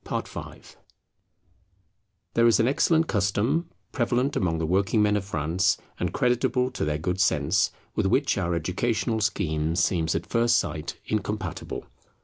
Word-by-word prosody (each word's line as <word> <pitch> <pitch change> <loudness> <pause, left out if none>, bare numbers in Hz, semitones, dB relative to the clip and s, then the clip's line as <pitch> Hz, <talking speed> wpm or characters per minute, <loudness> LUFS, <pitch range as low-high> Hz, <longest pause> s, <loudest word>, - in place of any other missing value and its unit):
[Travels - - -3
of - - -11
Apprentices] - - -14 1.6
There 115 0 +4
is 115 - +4
an 115 - +3
excellent 160 +4 +3
custom 110 - 0 0.2
prevalent 125 +2 0
among 80 -4 0
the 80 - -1
working 95 +5 +2
men 105 0 +3
of 105 - 0
France 90 +2 0 0.2
and - - -1
creditable 125 +1 +1
to 125 - -3
their 75 0 0
good 90 +4 -2
sense, 80 +5 +2 0.3
with - - +1
which 135 +8 +2
our 90 -3 -1
educational 110 +7 -1
scheme 80 -6 0
seems 85 -2 +1
at 85 +1 -2
first 120 +1 +3
sight 75 -8 -3
incompatible. 105 -4 -3
100 Hz, 150 wpm, -26 LUFS, 85-120 Hz, 1.6 s, There